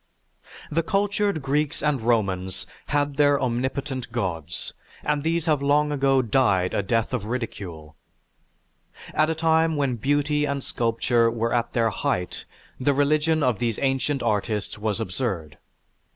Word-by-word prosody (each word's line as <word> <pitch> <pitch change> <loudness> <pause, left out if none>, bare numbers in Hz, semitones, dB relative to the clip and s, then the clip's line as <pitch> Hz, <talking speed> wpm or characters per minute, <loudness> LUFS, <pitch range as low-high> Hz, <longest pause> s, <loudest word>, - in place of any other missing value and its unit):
"_) - - -5
The 165 - +4
cultured 200 -2 0
Greeks 145 +1 0
and 150 -5 +1
Romans 95 -5 0 0.2
had 145 -1 0
their 145 -1 +4
omnipotent 130 +1 -2
gods 85 -8 -4 0.3
and 150 -1 0
these 165 +1 0
have 150 -4 +2
long 145 +1 +3
ago 135 -2 +3
died 105 -7 +2
a - - +1
death 115 +4 0
of 115 -5 -2
ridicule. 95 -10 -5 1.2
At 155 +1 +3
a 160 - 0
time 160 0 +2
when 135 -4 0
beauty 145 +4 +1
and 140 -2 -2
sculpture 115 0 +1
were 115 0 -1
at 120 -1 0
their 115 -2 +2
height 90 -3 -2 0.3
the 140 +2 +2
religion 155 +2 +2
of 125 -5 +1
these 115 -3 0
ancient 135 0 0
artists 105 0 -1
was 105 0 -1
absurd. 95 - -3
130 Hz, 145 wpm, -24 LUFS, 110-145 Hz, 1.2 s, The